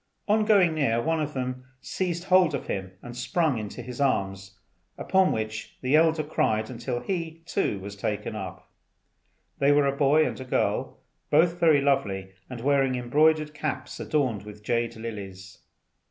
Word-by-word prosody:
On 215 Hz, +1 st, +3 dB
going 195 Hz, -6 st, +5 dB
near, 140 Hz, -7 st, +1 dB
one 160 Hz, +5 st, 0 dB
of 150 Hz, -1 st, -4 dB
them 130 Hz, 0 st, -3 dB, 0.2 s
seized 175 Hz, +1 st, -3 dB
hold 185 Hz, -4 st, +4 dB
of 135 Hz, -, -5 dB
him 95 Hz, -1 st, -4 dB
and 120 Hz, 0 st, -8 dB
sprung 125 Hz, +2 st, 0 dB
into 105 Hz, +3 st, -6 dB
his 125 Hz, +3 st, -6 dB
arms; 95 Hz, -7 st, -1 dB, 0.4 s
upon 190 Hz, -1 st, +2 dB
which 110 Hz, 0 st, -4 dB
the 130 Hz, +3 st, +2 dB
elder 160 Hz, 0 st, +4 dB
cried 110 Hz, -6 st, 0 dB
until 120 Hz, 0 st, -4 dB
he, 165 Hz, -3 st, -4 dB
too, 170 Hz, -, -1 dB
was 100 Hz, +1 st, -8 dB
taken 105 Hz, +1 st, -3 dB
up. 95 Hz, -4 st, -7 dB, 0.9 s
They 140 Hz, +1 st, +4 dB
were 145 Hz, 0 st, +4 dB
a 140 Hz, 0 st, +1 dB
boy 150 Hz, +2 st, +4 dB
and 130 Hz, -1 st, -5 dB
girl, -, -, 0 dB, 0.3 s
both 170 Hz, +3 st, +3 dB
very 160 Hz, -4 st, +5 dB
lovely, 100 Hz, -9 st, 0 dB, 0.2 s
and 125 Hz, -2 st, -7 dB
wearing 135 Hz, -1 st, +2 dB
embroidered 150 Hz, +5 st, +2 dB
caps 155 Hz, -, -4 dB
adorned 130 Hz, -9 st, 0 dB
with 105 Hz, 0 st, -12 dB
jade 115 Hz, +1 st, -1 dB
lilies. 100 Hz, -4 st, -8 dB
130 Hz, 160 wpm, -26 LUFS, 110-155 Hz, 0.9 s, going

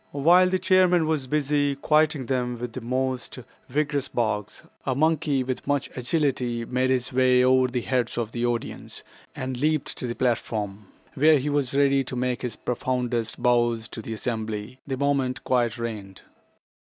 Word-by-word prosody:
While 175 Hz, +6 st, +5 dB
the 185 Hz, -, +1 dB
chairman 185 Hz, -2 st, +4 dB
was 155 Hz, -4 st, -1 dB
busy 145 Hz, 0 st, +1 dB
quieting 150 Hz, -1 st, +2 dB
them 125 Hz, -1 st, -1 dB
with 120 Hz, +1 st, -6 dB
most 130 Hz, +2 st, -2 dB, 0.3 s
vigorous 145 Hz, 0 st, 0 dB
barks, 105 Hz, -3 st, -2 dB, 0.2 s
a 130 Hz, -, -1 dB
monkey 150 Hz, -2 st, +1 dB
with 130 Hz, 0 st, -4 dB
much 145 Hz, -2 st, 0 dB
agility 125 Hz, -3 st, -1 dB
made 125 Hz, +2 st, 0 dB
his 130 Hz, -1 st, 0 dB
way 130 Hz, 0 st, +4 dB
over 130 Hz, 0 st, +4 dB
the 125 Hz, -1 st, -2 dB
heads 125 Hz, -1 st, -1 dB
of 115 Hz, -2 st, -2 dB
the 120 Hz, 0 st, -3 dB
audience, 120 Hz, -1 st, -3 dB, 0.3 s
and 130 Hz, -1 st, -4 dB
leaped 155 Hz, 0 st, 0 dB
to 125 Hz, -, -3 dB
the 120 Hz, -, -4 dB
platform, 105 Hz, -5 st, -2 dB, 0.3 s
where 155 Hz, +1 st, +5 dB
he 140 Hz, +2 st, -2 dB
was 140 Hz, -2 st, 0 dB
ready 140 Hz, -1 st, +3 dB
to 130 Hz, -, -6 dB
make 125 Hz, 0 st, -1 dB
his 125 Hz, -4 st, -4 dB
profoundest 125 Hz, -2 st, -2 dB
bows 120 Hz, -2 st, +2 dB
to 110 Hz, -, -7 dB
the 110 Hz, -, -6 dB
assembly 110 Hz, +1 st, -4 dB
the 135 Hz, -2 st, -2 dB
moment 140 Hz, -2 st, 0 dB
quiet 120 Hz, -2 st, +1 dB
reigned. 105 Hz, -5 st, -6 dB
130 Hz, 165 wpm, -25 LUFS, 120-145 Hz, 0.3 s, While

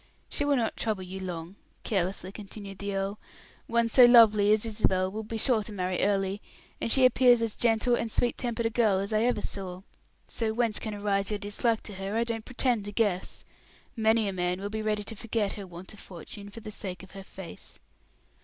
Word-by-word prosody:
She -, -, 0 dB
will 285 Hz, -1 st, +3 dB
not 230 Hz, -4 st, 0 dB
trouble 215 Hz, -4 st, -2 dB
you 185 Hz, +1 st, -7 dB
long," 180 Hz, 0 st, -6 dB, 0.3 s
carelessly 190 Hz, -2 st, -1 dB
continued 200 Hz, -1 st, -9 dB
the 200 Hz, 0 st, -3 dB
earl. 195 Hz, +2 st, -2 dB, 0.5 s
"One 235 Hz, 0 st, +2 dB
so 245 Hz, +2 st, +8 dB
lovely 215 Hz, -4 st, +7 dB
as 215 Hz, +1 st, +3 dB
Isabel 190 Hz, -4 st, +1 dB
will 215 Hz, +2 st, -4 dB
be 220 Hz, +1 st, -5 dB
sure 230 Hz, 0 st, +2 dB
to 215 Hz, -, -6 dB
marry 185 Hz, -2 st, -2 dB
early; 195 Hz, 0 st, 0 dB, 0.4 s
and 230 Hz, -, -1 dB
she 260 Hz, +1 st, +5 dB
appears 250 Hz, -1 st, +6 dB
as 225 Hz, -2 st, -2 dB
gentle 235 Hz, +1 st, +2 dB
and 230 Hz, -1 st, 0 dB
sweet 240 Hz, +2 st, +1 dB
tempered 235 Hz, -2 st, -2 dB
a 225 Hz, -, +1 dB
girl 220 Hz, -4 st, +3 dB
as 200 Hz, +3 st, -2 dB
I 215 Hz, -, +3 dB
ever 240 Hz, -4 st, +1 dB
saw; 185 Hz, -2 st, -4 dB, 0.4 s
so 220 Hz, -2 st, -2 dB
whence 230 Hz, -3 st, +1 dB
can 215 Hz, -2 st, -5 dB
arise 200 Hz, -1 st, 0 dB
your 210 Hz, -, -1 dB
dislike 210 Hz, +3 st, 0 dB
to 210 Hz, -, -8 dB
her, 195 Hz, +2 st, -4 dB
I 230 Hz, -, +3 dB
don't 230 Hz, -2 st, -4 dB
pretend 245 Hz, -4 st, 0 dB
to 205 Hz, -, -5 dB
guess. 205 Hz, -4 st, -1 dB, 0.5 s
Many 220 Hz, -1 st, +3 dB
a 195 Hz, -, -2 dB
man 180 Hz, 0 st, -1 dB
will 200 Hz, +1 st, -5 dB
be 220 Hz, 0 st, -3 dB
ready 210 Hz, -1 st, -1 dB
to 225 Hz, -, -5 dB
forget 215 Hz, -1 st, -1 dB
her 200 Hz, -2 st, -8 dB
want 180 Hz, +3 st, -10 dB
of 210 Hz, -, -14 dB
fortune 200 Hz, +3 st, -9 dB
for 225 Hz, +3 st, -10 dB
the 215 Hz, -1 st, -8 dB
sake 190 Hz, -3 st, -6 dB
of 190 Hz, -, -13 dB
her 195 Hz, 0 st, -9 dB
face." 190 Hz, -2 st, -9 dB
210 Hz, 215 wpm, -28 LUFS, 195-230 Hz, 0.5 s, so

